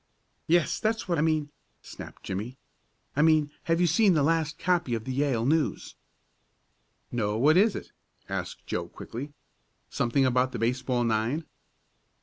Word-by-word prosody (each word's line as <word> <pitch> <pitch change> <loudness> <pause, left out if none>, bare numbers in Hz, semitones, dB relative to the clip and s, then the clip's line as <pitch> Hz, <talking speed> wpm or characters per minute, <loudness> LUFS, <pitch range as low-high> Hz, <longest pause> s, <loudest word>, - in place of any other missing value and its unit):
"Yes, 170 0 +2
that's 220 0 -1
what 170 -3 +1
I - - +3
mean!" 155 -2 +1 0.3
snapped - - -10
Jimmie. 110 +7 -5 0.6
"I 145 - +3
mean 155 -2 +4
have 165 0 +2
you 180 - +4
seen 180 +3 +4
the 150 - +3
last 160 0 +1
copy 175 -9 +1
of 110 - -4
the 130 +2 -4
Yale 130 -4 +1
News?" 155 +3 0 1.2
"No; 105 -3 -1
what 150 +7 +5
is 205 +3 +4
it?" - - -7 0.4
asked - - -5
Joe - - -3
quickly. 135 +6 -8 0.6
"Something 130 +3 +1
about 130 0 +2
the - - -3
baseball 125 +2 0
nine?" 115 +7 0
145 Hz, 150 wpm, -27 LUFS, 120-165 Hz, 1.2 s, what